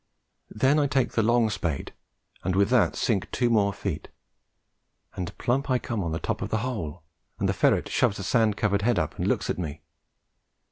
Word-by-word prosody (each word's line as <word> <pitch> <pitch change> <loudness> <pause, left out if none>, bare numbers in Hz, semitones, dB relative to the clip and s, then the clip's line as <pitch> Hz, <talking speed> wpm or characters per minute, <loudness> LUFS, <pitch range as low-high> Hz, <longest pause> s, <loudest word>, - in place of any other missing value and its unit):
Then 130 +7 +2
I 145 - +3
take 130 -3 +1
the 115 - +1
long 115 0 +3
spade, 85 -7 -3 0.5
and 95 0 0
with 100 +3 +3
that 125 -3 +3
sink 105 -6 0
two 120 -1 +1
more 100 -3 +3
feet, 95 -6 -4 1.1
and 90 -2 -5
plump 135 +3 0
I 130 - +3
come 115 -4 -3
on 85 - -2
the 80 - -1
top 105 +4 -3
of - - -3
the 110 +2 -1
hole, 90 -10 -4 0.3
and - - 0
the - - +1
ferret - - +2
shoves 105 - +1
a 95 - -5
sand 110 +1 +2
covered 100 -2 +1
head 115 0 +2
up 80 -3 -2
and - - 0
looks - - 0
at - - -4
me. 80 -3 -5
105 Hz, 200 wpm, -26 LUFS, 90-120 Hz, 1.1 s, I